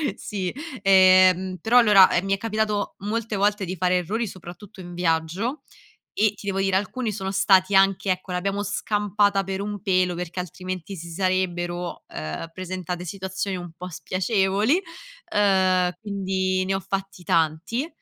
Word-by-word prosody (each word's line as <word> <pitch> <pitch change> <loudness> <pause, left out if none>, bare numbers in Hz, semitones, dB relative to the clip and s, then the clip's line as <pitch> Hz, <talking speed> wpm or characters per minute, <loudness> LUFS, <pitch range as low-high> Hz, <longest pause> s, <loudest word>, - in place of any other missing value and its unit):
sì. 190 -4 -4 0.3
Ehm, 185 -1 +5
però 240 +5 +5
allora, 210 -5 +7
ehm, 175 - +1
mi 195 - +1
è - - +1
capitato 215 -1 -1
molte 215 +2 -3
volte 205 0 +1
di 185 +1 -4
fare 180 +1 +1
errori 215 +7 -2
soprattutto 185 +1 -11
in 175 -1 -9
viaggio 175 - -1 0.6
e 215 -1 +4
ti 205 - -12
devo 195 -1 -1
dire 195 -1 +1
alcuni 215 +4 -1
sono 190 -1 -4
stati 195 0 +4
anche 195 0 +3
ecco 185 0 -2
l'abbiamo 195 +3 -1
scampata 205 0 +1
per 190 +1 -4
un 205 0 -4
pelo, 185 -3 +1
perché 180 +1 -4
altrimenti 185 +1 -6
si 170 0 -8
sarebbero, 175 -1 -2
ehm, 80 - -6
presentate 180 -1 -5
situazioni 190 +2 -4
un 175 -1 -7
po' 180 +1 -7
spiacevoli, 195 - 0 0.5
uhm, 190 -3 +3
quindi 190 -2 -1
ne 190 +1 -1
ho 190 - -1
fatti 195 0 -5
tanti. 165 - 0
190 Hz, 155 wpm, -24 LUFS, 180-205 Hz, 0.6 s, allora